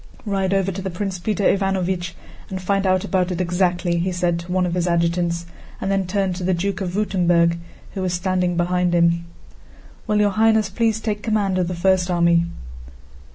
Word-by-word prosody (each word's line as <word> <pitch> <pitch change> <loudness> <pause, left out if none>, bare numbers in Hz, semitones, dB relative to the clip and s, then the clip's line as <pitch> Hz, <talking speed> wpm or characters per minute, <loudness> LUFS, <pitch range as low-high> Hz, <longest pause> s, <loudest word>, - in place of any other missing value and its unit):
"Ride 195 -2 0
over 195 -1 +1
to 190 +1 -4
Prince 185 0 -4
Peter 205 +3 -1
Ivánovich 190 -3 0 0.4
and 190 - -4
find 195 +1 0
out 185 0 +2
about 185 -2 0
it 180 - -3
exactly," 175 -1 +1
he 185 +2 -1
said 175 -1 0
to 170 +1 -8
one 185 0 +2
of 175 - -2
his 180 0 0
adjutants, 170 0 0 0.3
and 195 - -2
then 195 -2 0
turned 190 -1 0
to 180 - -5
the 185 0 +1
Duke 195 +3 -2
of 180 -2 -3
Württemberg 175 -4 +2 0.3
who 195 - -4
was 185 -1 -1
standing 180 -1 0
behind 180 0 +1
him. 170 0 +2 0.8
"Will 210 0 +2
Your 205 -1 +3
Highness 220 -1 +3
please 225 +1 +1
take 215 -2 -3
command 205 -4 0
of 180 - 0
the 180 - -3
first 185 +1 +2
army?" 170 -1 +3
185 Hz, 190 wpm, -21 LUFS, 175-195 Hz, 0.8 s, Your